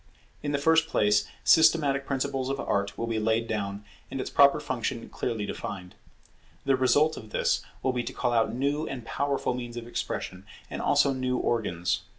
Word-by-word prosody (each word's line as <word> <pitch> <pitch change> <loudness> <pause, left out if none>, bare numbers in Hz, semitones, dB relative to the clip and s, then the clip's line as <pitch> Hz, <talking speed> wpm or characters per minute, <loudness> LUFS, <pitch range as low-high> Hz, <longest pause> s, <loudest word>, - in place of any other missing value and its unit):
In 145 - -2
the 145 - +1
first 160 +2 +3
place 105 -4 +2 0.2
systematic 145 -4 +4
principles 135 -1 -1
of 135 0 -2
Art 100 0 -1
will 115 - -2
be 115 -1 -1
laid 110 +1 +1
down, 100 -2 -3 0.2
and 135 - -5
its - - -4
proper 140 +1 +6
function 125 -4 -3
clearly 110 -3 -3
defined. 90 -3 -6 0.7
The 135 - +4
result 145 +5 +3
of 110 - -9
this - - +1 0.2
will 130 - +1
be 125 - 0
to - - -5
call 120 -2 0
out 115 -1 +2
new 140 +5 -1
and 125 -4 -6
powerful 140 0 -1
means 120 -1 -6
of 120 - -5
expression, 95 -5 -4 0.3
and - - -4
also 140 - +3
new 130 -1 -1
organs. 90 -9 0
125 Hz, 180 wpm, -27 LUFS, 110-140 Hz, 0.7 s, proper